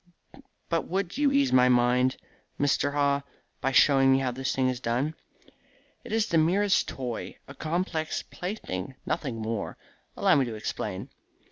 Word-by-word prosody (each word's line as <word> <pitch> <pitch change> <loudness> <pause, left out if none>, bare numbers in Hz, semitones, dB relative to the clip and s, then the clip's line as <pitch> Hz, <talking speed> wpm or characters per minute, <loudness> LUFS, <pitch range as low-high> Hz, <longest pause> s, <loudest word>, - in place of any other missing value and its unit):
But 165 -1 -1
would 190 +5 -2
you 290 -2 +3
ease 280 0 +2
my 125 0 +6
mind, 125 +1 +3 0.4
Mr. 145 0 +1
Haw, 140 -1 +2 0.4
by 135 - +1
showing 135 0 +5
me 135 - +5
how 135 -2 0
this 130 +1 -2
thing 130 -1 +2
is 125 -1 -1
done?" 125 +6 -1 0.9
"It - - -10
is 220 -1 +2
the 170 -7 +2
merest 190 +5 +3
toy 125 -3 -5
a - - -9
complex 160 -1 -2
plaything, 135 - -5
nothing 135 -8 -2
more. 110 -1 -3 0.4
Allow - - +4
me 135 - +3
to 115 -2 -5
explain. 105 -2 -4
135 Hz, 155 wpm, -27 LUFS, 125-170 Hz, 0.9 s, my